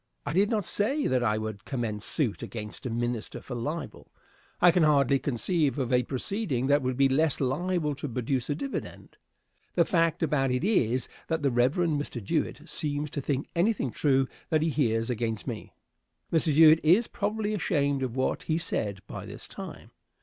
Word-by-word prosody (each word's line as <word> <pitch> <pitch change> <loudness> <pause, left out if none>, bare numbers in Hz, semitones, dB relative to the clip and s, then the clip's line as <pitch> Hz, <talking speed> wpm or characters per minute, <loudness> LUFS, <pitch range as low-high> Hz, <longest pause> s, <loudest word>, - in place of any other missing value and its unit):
I - - -2
did 200 +4 +3
not 215 -5 0
say 265 - 0
that 130 -1 +2
I 110 -3 +1
would 110 -2 -5
commence 115 -5 -3
suit 130 -10 0
against 105 +2 -6
a - - -3
minister 120 -1 -3
for 130 - -8
libel. 150 +8 -5 0.5
I 175 0 +7
can 175 - +2
hardly 140 -3 +4
conceive 145 +3 0
of 130 -2 -1
a 125 - +5
proceeding 135 - -2
that 145 +2 +3
would 130 -1 -2
be 135 0 +5
less 150 +3 +2
liable 150 +3 0
to 140 +1 -5
produce 125 +2 -2
a 145 - +1
dividend. 275 - -6 0.6
The 170 - +4
fact 165 -2 +1
about 140 -4 +1
it 125 +3 0
is, 130 - +2 0.2
that 160 -2 -1
the 140 - +3
Rev. 120 +4 +2
Mr. 150 -8 -1
Jewett - - -2
seems 145 0 -2
to 145 - -3
think 135 0 -2
anything 175 - +1
true 135 -1 +2 0.2
that 155 -1 +2
he 165 - +1
hears 115 -5 +1
against 115 -2 -2
me. 115 -5 -6 0.6
Mr. 160 -1 +3
Jewett 155 +1 +7
is 185 +9 +5
probably 210 +1 -2
ashamed 145 -8 0
of 130 -2 -2
what 130 - 0
he 160 - -1
said 105 - -2
by - - -7
this - - -8
time. - - -9
140 Hz, 185 wpm, -28 LUFS, 125-165 Hz, 0.6 s, I